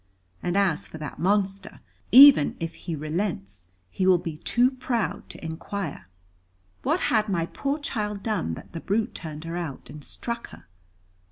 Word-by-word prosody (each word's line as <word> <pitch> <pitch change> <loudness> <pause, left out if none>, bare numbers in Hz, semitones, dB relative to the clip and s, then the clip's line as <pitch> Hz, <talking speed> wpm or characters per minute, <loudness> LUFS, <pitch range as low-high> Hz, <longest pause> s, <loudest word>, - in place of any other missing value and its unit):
And 175 +2 -1
as 190 -6 +1
for - - -9
that 150 -2 -7
monster, 195 +1 0 0.3
even 270 - +9
if 165 0 -4
he 170 -3 -5
relents, 150 - -3 0.2
he 185 - 0
will 185 -1 +7
be 165 -3 -5
too 245 +10 +2
proud 250 -4 -2
to - - -9
inquire." 160 - -5 0.7
"What - - +1
had 215 -1 +3
my 170 -4 +1
poor 275 - -2
child 210 -8 -3
done, 205 - -1
that - - -12
the 165 - -4
brute 215 +3 0
turned 155 -2 -7
her 165 +1 -5
out, 165 -6 -6
and 150 -1 -10
struck 235 - -5
her?" - - -14
185 Hz, 165 wpm, -26 LUFS, 160-210 Hz, 0.7 s, even